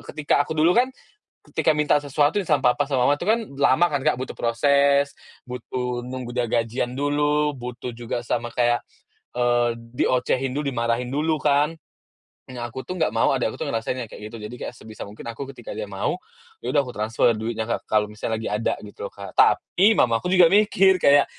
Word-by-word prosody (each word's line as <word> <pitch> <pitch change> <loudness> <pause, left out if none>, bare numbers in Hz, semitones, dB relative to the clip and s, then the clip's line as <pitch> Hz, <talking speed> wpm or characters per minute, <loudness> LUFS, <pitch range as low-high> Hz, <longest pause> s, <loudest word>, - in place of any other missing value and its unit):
ketika 145 -1 +2
aku 155 +2 -4
dulu 165 +3 +4
kan, 250 +2 +3 0.6
ketika 155 - +2
minta 150 -1 +3
sesuatu 145 +5 +1
sama 145 -5 +3
papa 145 +3 0
sama 135 -3 +1
mama 145 +1 +3
itu 175 - -5
kan 225 +2 +3 0.2
lama 145 +4 +4
kan, 145 - 0
Kak, - - +4
butuh 130 +2 -6
proses, 140 +4 +3 0.3
butuh 125 0 -4
nunggu 125 -1 -6
dia 120 -1 +1
gajian 115 +2 -1
dulu, 145 +2 +1
butuh 125 0 -6
juga 120 0 -5
sama 120 0 -3
kayak, 120 -1 +2 0.6
eee, 120 -1 +2
diocehin 125 +2 0
dulu, 145 +3 -3
dimarahin 120 +2 -1
dulu 155 +2 +1
kan. 150 +2 +1 0.7
Nah, 120 -2 -6
aku 130 +3 -7
tuh 185 -1 -6
nggak - - +3
mau - - +2
adik - - +1
aku - - -9
tuh - - -4
ngerasain 115 +3 -2
yang 125 - -4
kayak 105 0 -9
gitu, 115 - -10
jadi 110 +2 -7
sebisa 110 -4 -10
mungkin 105 - -11
aku 135 +3 -7
ketika 120 -4 -9
dia 105 -1 -5
mau, 100 - -2 0.4
ya - - -6
udah - - +6
aku 125 - -8
transfer 110 +2 +1
duitnya 110 0 -3
ke 115 - -1
kalau 105 -1 +3
misalnya 110 +1 -3
lagi 110 - -4
ada 105 +2 0
gitu 100 -1 -7
loh, - - -27
Kak. 100 0 -8
Tapi 205 +4 +4
mamaku 115 +7 +2
juga 180 -2 +5
mikir 195 -3 +4
kayak, 140 -1 +6
125 Hz, 195 wpm, -23 LUFS, 115-145 Hz, 0.7 s, udah